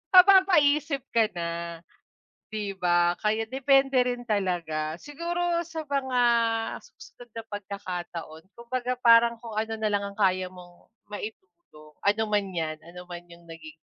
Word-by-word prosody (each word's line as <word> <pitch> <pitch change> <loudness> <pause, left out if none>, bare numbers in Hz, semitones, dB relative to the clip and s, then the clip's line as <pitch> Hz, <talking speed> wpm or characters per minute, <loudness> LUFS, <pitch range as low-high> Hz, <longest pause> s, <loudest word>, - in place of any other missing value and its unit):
mapapapaisip 325 -7 +6
ka 225 -2 +4
na 170 -1 -2 1.1
'di 205 -2 -3
ba, 175 0 +3
kaya 220 +1 +1
depende 270 +1 +3
rin 245 -1 -2
talaga. 170 -7 -1
Siguro 340 +3 -2
sa 320 0 -5
mga 265 -3 0 0.6
susunod 245 - -15
na 225 - -6
pagkakataon 180 -5 -6
kumbaga 245 +1 -3
parang 235 0 +6
kung 225 -3 -8
ano 220 +1 -1
nalang 200 -2 -1
ang - - -24
kaya 185 -2 +2
mong 175 -1 -16 0.2
maitulong, 210 - -10
ano 205 +2 +3
man 205 -1 +1
'yan, 160 -2 -2
ano 180 +1 -11
man 175 0 -8
yung 170 -1 -17
naging 160 -1 -11
215 Hz, 135 wpm, -27 LUFS, 175-270 Hz, 1.1 s, mapapapaisip